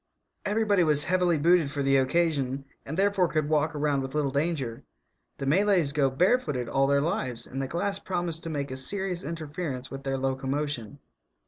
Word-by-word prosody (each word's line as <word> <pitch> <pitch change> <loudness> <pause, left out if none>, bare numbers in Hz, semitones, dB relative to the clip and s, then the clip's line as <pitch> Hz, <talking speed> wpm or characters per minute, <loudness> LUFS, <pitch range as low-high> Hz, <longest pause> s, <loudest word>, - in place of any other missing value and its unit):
Everybody 205 -2 +2
was 150 -2 +4
heavily 180 -2 +2
booted 165 0 +4
for 140 -1 -2
the 135 0 +4
occasion, 135 -2 +1 0.2
and 155 - -4
therefore 195 -2 +3
could 155 -3 -1
walk 155 +1 +1
around 145 -2 +1
with 135 +2 -6
little 145 -3 +1
danger. 140 -5 -2 0.5
The 135 - -4
Malays 180 0 +3
go 140 -2 +2
barefooted 150 - +1
all 135 +3 +2
their 140 0 +3
lives, 130 -6 -2
and 135 +1 -5
the 135 - -2
glass 195 +6 -2
promised 175 -4 -2
to - - -3
make 140 -3 -3
a 130 - -4
serious 185 +5 -1
interference 150 -4 -5
with 135 - -6
their 135 -1 -2
locomotion. 135 -2 -2
150 Hz, 180 wpm, -27 LUFS, 135-175 Hz, 0.5 s, was